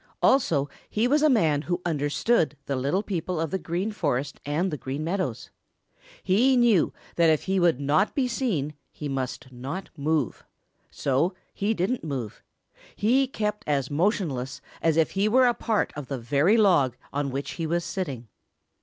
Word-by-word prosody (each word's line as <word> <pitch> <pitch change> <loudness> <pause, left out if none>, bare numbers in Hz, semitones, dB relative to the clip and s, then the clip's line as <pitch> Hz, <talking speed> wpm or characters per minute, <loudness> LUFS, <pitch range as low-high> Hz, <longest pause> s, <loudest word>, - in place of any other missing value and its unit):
Also 160 - +3 0.2
he 220 +3 +1
was 290 +3 +3
a 310 - +5
man 160 - +3
who 175 +3 -2
understood 150 +3 +1
the 140 - -2
little 140 +10 0
people 180 -3 -3
of 160 -2 -2
the 190 - -1
Green 180 +6 -2
Forest 145 -8 -2
and 170 +6 0
the 150 - -3
Green 135 +3 -4
Meadows. 170 - -3 0.7
He 250 +8 +4
knew 235 -8 +4 0.3
that 170 -1 +5
if 155 -2 +2
he 190 0 0
would 170 -6 +3
not 145 +8 +2
be 265 -3 +2
seen 210 - -1 0.2
he 150 - -6
must 135 0 -4
not 140 +10 -6
move. 150 -4 -1 0.5
So 145 +8 0 0.2
he 210 +3 0
didn't 200 +8 -1
move. 130 -9 -5 0.5
He 260 +6 +3
kept 210 -4 -3
as 140 -2 0
motionless 150 - 0 0.2
as 165 -1 +2
if 160 - +3
he 200 +2 +1
were 255 +3 +5
a 245 - +4
part 225 -3 -1
of 145 -3 -6
the 135 - -3
very 145 - +3
log 165 - +4 0.2
on 140 0 -1
which 135 +2 -4
he 165 -2 -3
was 170 +1 0
sitting. 145 -11 -4
165 Hz, 170 wpm, -26 LUFS, 140-205 Hz, 0.7 s, a